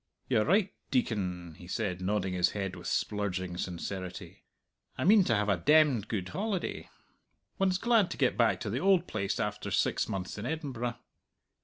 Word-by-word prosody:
"You're 110 -4 +2
right, 195 +2 +2 0.2
Deacon," 90 - -1
he 90 - -11
said, 95 -2 -2
nodding 95 0 0
his 90 -1 +3
head 95 -2 -3
with 85 - -8
splurging 95 -4 -1
sincerity. 90 0 -5 0.6
"I - - -1
mean 200 +2 +6
to 115 - +2
have 105 0 +1
a 100 -3 +2
demned 140 - +4
good 95 -4 -3
holiday. 200 -2 -3 0.7
One's 190 -1 +2
glad 225 -3 +3
to - - -5
get 130 -3 +2
back 115 -2 +3
to 105 -5 -3
the 120 - -1
old 190 0 +4
place 100 - -2
after 105 -1 -2
six - - +1
months 95 +1 -4
in 110 - -4
Edinburgh." 130 -7 -3
105 Hz, 170 wpm, -30 LUFS, 95-150 Hz, 0.7 s, mean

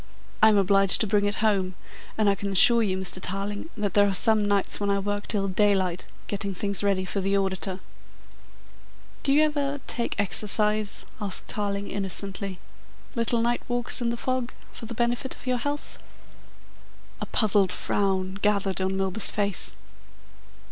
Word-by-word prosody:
I 220 - +7
am 210 - +3
obliged 195 0 +4
to - - +3
bring 205 0 +1
it 205 0 -1
home, 190 -4 0 0.4
and 215 -1 +1
I 200 - +4
can 200 0 -5
assure 235 +5 +6
you, 190 -4 -1
Mr. 190 -1 -1
Tarling, 200 - -3
that 205 -3 -2
there 205 0 +4
are 195 - 0
some 215 +1 +4
nights 200 -1 0
when 205 0 -2
I 200 - +1
work 205 +1 -3
till 200 -3 -1
daylight, 190 -2 0 0.2
getting 200 -1 -4
things 200 +1 -1
ready 195 -2 0
for 195 +2 -3
the 195 +1 0
auditor." 190 -1 -3 1.4
"Do 275 - +1
you 295 +2 +4
ever 285 -2 -1
take 235 -4 -3
exercise?" 210 +1 +3 0.2
asked 200 -2 -3
Tarling 200 -1 -3
innocently. 195 0 -2 0.6
"Little 230 -1 0
night 240 +1 0
walks 245 +1 +1
in 235 - 0
the 235 - -3
fog 255 0 -3 0.2
for 230 - -9
the 235 - -6
benefit 240 +3 -1
of - - -16
your 250 -1 -1
health?" 290 +3 -5 1.2
A - - -4
puzzled 200 -4 +2
frown 190 -1 -1
gathered 200 -3 0
on 190 +1 -1
Milburgh's 195 +2 +2
face. 200 -2 +2
205 Hz, 165 wpm, -25 LUFS, 195-220 Hz, 1.4 s, I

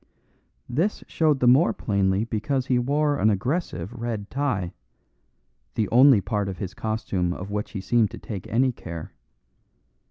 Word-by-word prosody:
This 170 - -1
showed 155 -4 +1
the 125 - +4
more 135 +8 +5
plainly 100 -1 +1
because 125 +4 -1
he 125 -2 +2
wore 145 +3 +1
an 110 - +4
aggressive 110 - -2
red 115 -4 -4
tie, 120 -11 -1 1.0
the 110 - +1
only 130 -2 +6
part 100 +1 -1
of 95 - -6
his 95 -2 -5
costume 100 -5 -2
of 95 +2 -7
which 105 0 -3
he 100 - -4
seemed 110 +1 +2
to - - -9
take 100 -5 -7
any 130 +4 +2
care. 85 -8 -8
110 Hz, 155 wpm, -25 LUFS, 100-130 Hz, 1.0 s, only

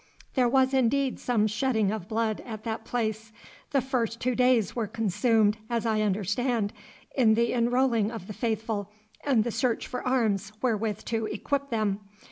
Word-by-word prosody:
'There 250 -3 +3
was 265 +1 +3
indeed 265 +1 +2
some 230 -4 +1
shedding 215 -2 +1
of 215 -5 -4
blood 220 -1 -1
at 220 -3 -7
that 225 -1 -3
place. 220 -2 -2 0.4
The 275 - +2
first 235 -3 -1
two 255 +1 0
days 250 -4 +3
were 230 -3 -1
consumed, 220 0 +2
as 235 -1 -1
I 220 -1 +2
understand, 210 +2 0 0.4
in 225 -5 +5
the 235 +1 +2
enrolling 240 -2 +2
of 225 -5 -7
the 210 - -7
faithful 220 -3 -2 0.3
and 255 -7 +3
the 235 - -2
search 245 0 0
for 250 - -4
arms 215 -6 +1
wherewith 220 -4 -1
to 225 -1 -1
equip 280 -1 -2
them. 215 -4 0
225 Hz, 165 wpm, -27 LUFS, 215-250 Hz, 0.4 s, in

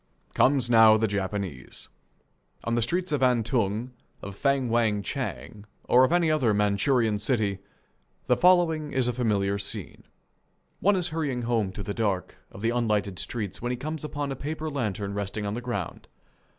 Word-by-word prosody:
Comes 130 -2 +3
now 110 -2 +7
the 110 0 +1
Japanese. 95 -8 -4 0.8
On 115 - -2
the 120 - +2
streets 175 +9 -1
of 145 -3 0
Antung, 120 -2 +1 0.3
of 100 0 -7
Feng 140 +2 +1
Wang 110 -3 +1
Chang, 105 +3 -5 0.2
or 125 +1 +5
of 130 - +3
any 170 -2 +3
other 125 -9 +2
Manchurian 105 +2 +2
city, 105 -4 0 0.7
the - - +3
following 170 -4 +3
is 130 -2 +1
a 125 - 0
familiar 100 -4 0
scene: 100 - -4 0.8
One 205 +1 +3
is 180 -2 -1
hurrying 145 -7 -2
home 115 -5 0
through 100 - -7
the 100 - -4
dark 100 -4 -2 0.2
of 100 - -11
the 115 - +2
unlighted 105 -6 0
streets 105 -6 -4
when 120 +1 -2
he 125 - -2
comes 155 +3 -5
upon 145 -2 -3
a - - -3
paper 155 +3 -4
lantern 105 -7 -3
resting 100 +1 -3
on 100 - -2
the 120 - -4
ground. 120 -8 -5
115 Hz, 170 wpm, -26 LUFS, 100-140 Hz, 0.8 s, now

